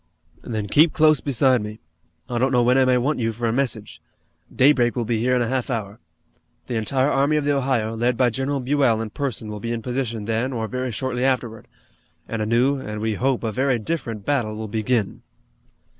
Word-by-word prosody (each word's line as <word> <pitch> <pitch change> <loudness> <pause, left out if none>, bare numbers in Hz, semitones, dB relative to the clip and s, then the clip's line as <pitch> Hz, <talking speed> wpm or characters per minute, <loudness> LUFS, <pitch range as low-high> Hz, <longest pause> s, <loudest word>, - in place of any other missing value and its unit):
"Then 110 -3 -4
keep 155 +9 +4
close 155 -1 +4
beside 130 -3 +2
me. 105 +1 -7 0.5
I 120 -1 -2
don't 130 +2 +2
know 125 -2 +3
when 125 +1 +3
I 135 -1 +4
may 130 -1 +3
want 140 +4 0
you 115 -1 0
for 115 +1 -3
a 115 - 0
message. 120 -5 -2 0.5
Daybreak 125 -3 +3
will 120 -2 -1
be 115 0 0
here 125 +3 +2
in 125 - +2
a - - -2
half 130 +1 -2
hour. 110 -4 -4 0.7
The - - -5
entire 130 +5 +1
Army 140 +3 +2
of 150 - -1
the 145 0 +2
Ohio, 125 -5 0
led 120 +1 0
by 125 -2 +3
General 135 +3 -2
Buell 130 -4 +2
in 110 -1 -4
person 115 -6 -3
will 105 - -6
be 115 +3 -4
in 115 -1 -3
position 120 -4 -3
then 115 +4 -1
or 110 -2 -2
very 125 +1 -3
shortly 125 +3 -2
afterward, 120 -5 -1 0.6
and 115 -1 -3
a 105 - -1
new, 125 +5 +2
and, 105 -4 -6
we 110 0 -1
hope, 130 +3 0
a 110 - -1
very 130 +2 +1
different 115 -4 -4
battle 120 -7 0
will 110 0 -5
begin." 110 0 -1
120 Hz, 215 wpm, -22 LUFS, 110-135 Hz, 0.7 s, keep